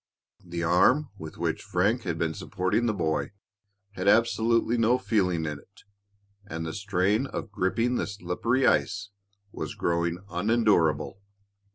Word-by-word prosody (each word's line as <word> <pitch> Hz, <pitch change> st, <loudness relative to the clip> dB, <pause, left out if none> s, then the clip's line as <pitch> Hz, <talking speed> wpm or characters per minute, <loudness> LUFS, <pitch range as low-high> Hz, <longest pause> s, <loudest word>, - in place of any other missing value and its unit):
The 85 Hz, -1 st, -4 dB
arm 125 Hz, -, +3 dB
with 80 Hz, 0 st, -8 dB
which -, -, -1 dB
Frank 105 Hz, +7 st, 0 dB
had 85 Hz, -2 st, -2 dB
been 80 Hz, -1 st, -1 dB
supporting 95 Hz, +9 st, -1 dB
the -, -, +2 dB
boy 80 Hz, +1 st, -1 dB, 0.6 s
had 95 Hz, -1 st, -4 dB
absolutely 115 Hz, +2 st, +3 dB
no 115 Hz, +1 st, +3 dB
feeling 90 Hz, -9 st, 0 dB
in 75 Hz, -2 st, -4 dB
it, 100 Hz, -, -21 dB, 0.6 s
and 80 Hz, -4 st, -5 dB
the 80 Hz, -, -4 dB
strain 100 Hz, +5 st, 0 dB
of 115 Hz, -, -6 dB
gripping 115 Hz, +6 st, 0 dB
the -, -, -1 dB
slippery 100 Hz, +7 st, -1 dB
ice 105 Hz, -3 st, +1 dB, 0.4 s
was -, -, -5 dB
growing 85 Hz, 0 st, 0 dB
unendurable. 95 Hz, -3 st, +1 dB
100 Hz, 140 wpm, -27 LUFS, 85-115 Hz, 0.6 s, arm